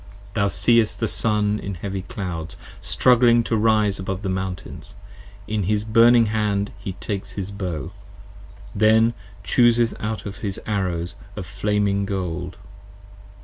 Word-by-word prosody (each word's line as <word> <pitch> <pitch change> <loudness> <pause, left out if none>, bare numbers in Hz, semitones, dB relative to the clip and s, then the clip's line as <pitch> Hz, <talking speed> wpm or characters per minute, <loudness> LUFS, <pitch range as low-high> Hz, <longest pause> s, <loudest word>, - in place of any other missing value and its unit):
Thou 100 - +2
seest 115 +2 +2
the 115 - 0
Sun 105 -1 +1
in 100 -1 -5
heavy 95 +2 -4
clouds 90 -4 -6 0.2
Struggling 120 -1 +4
to 115 - -1
rise 105 -2 +2
above 95 +1 -4
the 95 - -2
Mountains, 95 -1 -5 0.5
in 105 -3 -1
his 105 +2 +1
burning 115 +2 +5
hand 105 -2 0
He 100 -2 -5
takes 100 0 -5
his 100 0 -5
Bow, 90 -8 -4 0.8
then 110 +2 +4 0.3
chooses 120 -2 +3
out 110 0 -3
his 100 -1 -5
arrows 90 -5 -2 0.2
of - - -5
flaming 100 -1 0
gold. 90 -2 -4
100 Hz, 130 wpm, -22 LUFS, 95-110 Hz, 0.8 s, burning